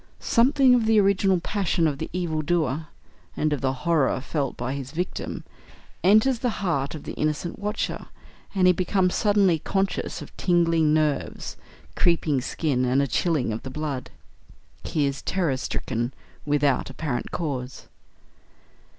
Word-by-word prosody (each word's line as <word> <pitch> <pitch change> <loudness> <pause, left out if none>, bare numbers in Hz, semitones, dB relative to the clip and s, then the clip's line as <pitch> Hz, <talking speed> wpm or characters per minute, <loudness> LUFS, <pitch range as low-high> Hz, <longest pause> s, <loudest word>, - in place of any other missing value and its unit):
Something 260 +2 +4
of 235 -3 +3
the 220 -1 +5
original 195 -2 +3
passion 180 -2 0
of 140 -2 -2
the - - -4
evil 170 -4 -1
doer, 155 -2 0 0.5
and 155 0 +1
of 145 - -2
the 130 - +1
horror 160 -6 +2
felt 140 0 -3
by 125 +2 -3
his 135 -2 -5
victim, 180 +3 -4 0.6
enters 220 +6 +5
the 250 - 0 0.2
heart 140 -4 0
of 150 - -8
the - - -6
innocent 155 +4 -2
watcher, 210 +1 -3 0.5
and 185 -2 +3
he 180 - +7
becomes 185 0 +1
suddenly 200 -6 +3
conscious 195 +4 -1
of - - -11
tingling 165 -3 +3
nerves, 155 -2 0 0.4
creeping 160 -6 +2
skin, 130 -1 -1
and 125 +2 +2
a 140 - +3
chilling 140 -3 0
of 110 - -4
the 130 - -7
blood. 140 -2 -4 0.7
He 150 -2 0
is 140 -1 -2
terror 175 -8 0
stricken 125 -1 -3 0.3
without 145 -2 +2
apparent 135 -2 -3
cause. 135 -6 -4
160 Hz, 150 wpm, -25 LUFS, 140-185 Hz, 0.7 s, he